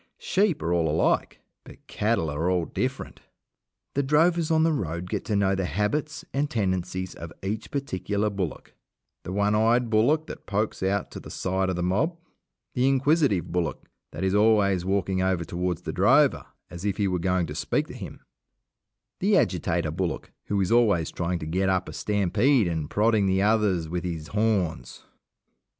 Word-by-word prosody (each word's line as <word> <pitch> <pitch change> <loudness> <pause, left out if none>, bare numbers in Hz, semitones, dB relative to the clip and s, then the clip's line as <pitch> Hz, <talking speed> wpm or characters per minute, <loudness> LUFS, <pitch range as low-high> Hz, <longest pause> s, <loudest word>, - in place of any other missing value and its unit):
Sheep 195 -4 +1
are 85 - 0
all 85 -2 +2
alike, 80 +2 0 0.2
but - - -15
cattle 105 -8 0
are 80 +5 -1
all 90 -2 +1
different. - - -4 0.7
The 140 - +1
drovers 160 +4 +2
on 160 -1 +3
the 165 0 +3
road 85 - -3
get - - -3
to 105 - -1
know 100 -1 +2
the 95 -1 -1
habits 145 - -2
and 140 +1 0
tendencies 95 - -2
of 85 -1 -9
each 105 +3 -3
particular 105 -6 -2
bullock 95 -5 -5 0.5
the - - -7
one 100 +2 +1
eyed 115 +2 +2
bullock 140 +9 +3
that - - -10
pokes 105 +1 -1
out 95 +1 -1
to - - -7
the - - -11
side 95 +1 -1
of 95 - -1
the 90 - -2
mob, 110 - 0 0.6
the 125 +1 +2
inquisitive 135 - +2
bullock 85 -3 -2 0.3
that - - -6
is 95 0 +1
always 105 -3 +3
walking 95 0 0
over 95 -2 0
towards 90 -1 -3
the - - -4
drover - - +3 0.2
as 85 +1 -8
if 100 -1 -1
he 100 - +1
were 90 -1 -1
going 90 0 +1
to 75 - -6
speak - - -1
to - - -11
him, - - -9 1.0
the - - +3
agitator - - 0
bullock - - -3
who 100 - -1
is 95 -2 0
always 105 -9 +3
trying 85 +1 -2
to 75 - -6
get 95 +5 0
up 95 -1 0
a 80 - -7
stampede 105 - +2
and 80 -3 -3
prodding 105 -1 +2
the 95 +1 +2
others 105 -6 +2
with 85 +1 -3
his 80 -3 -5
horns. 95 - -1
95 Hz, 180 wpm, -26 LUFS, 90-110 Hz, 1.0 s, on